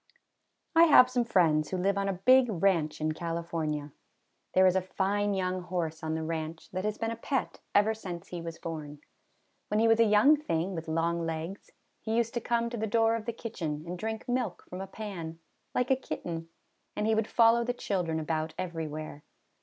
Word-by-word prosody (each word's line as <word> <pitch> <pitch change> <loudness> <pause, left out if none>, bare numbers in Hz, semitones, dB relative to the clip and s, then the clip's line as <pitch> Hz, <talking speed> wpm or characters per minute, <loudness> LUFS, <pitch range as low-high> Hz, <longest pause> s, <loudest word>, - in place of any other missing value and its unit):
I 330 +1 +8
have 255 -5 +7
some 245 -1 +2
friends 160 -8 +3
who 185 - -2
live 195 +2 +1
on 200 0 0
a - - 0
big 255 +8 +5
ranch 175 -5 +1
in 155 0 +1
California. 160 -2 -3 0.6
There 185 - +6
is 185 0 +4
a 190 - +3
fine 200 +2 0
young 185 -1 -1
horse 170 -3 -3
on 160 0 -2
the 160 - -2
ranch, 160 0 -5
that 185 +2 -3
has 215 0 -1
been 225 0 -2
a - - -3
pet 260 +3 -2 0.2
ever 210 +2 +5
since 185 -4 -7
he 175 -1 -5
was 165 0 -6
born. 150 -3 -7 0.7
When 210 - +1
he 225 - +4
was 225 0 +4
a - - +8
young 220 +8 +6
thing 190 - -2
with 165 -2 -5
long 165 +1 0
legs, 165 +4 -5 0.3
he 220 0 -2
used 230 -1 +1
to 240 - -2
come 235 0 0
to 240 - -4
the 220 0 -1
door 225 +1 +3
of 225 -2 -5
the - - +1
kitchen 170 -10 -5
and 175 +1 -4
drink 220 +4 -4
milk 250 0 -2
from 180 +1 -6
a 195 - -5
pan, 185 -6 -6 0.4
like 250 +1 +1
a - - +6
kitten; 165 -9 -5 0.5
and 210 - -1
he 220 - +3
would 220 0 +1
follow 230 0 +5
the 245 - 0
children 180 -9 -2
about 155 0 -2
every 170 -3 -3
where. 150 -1 -7
185 Hz, 210 wpm, -29 LUFS, 165-225 Hz, 0.7 s, I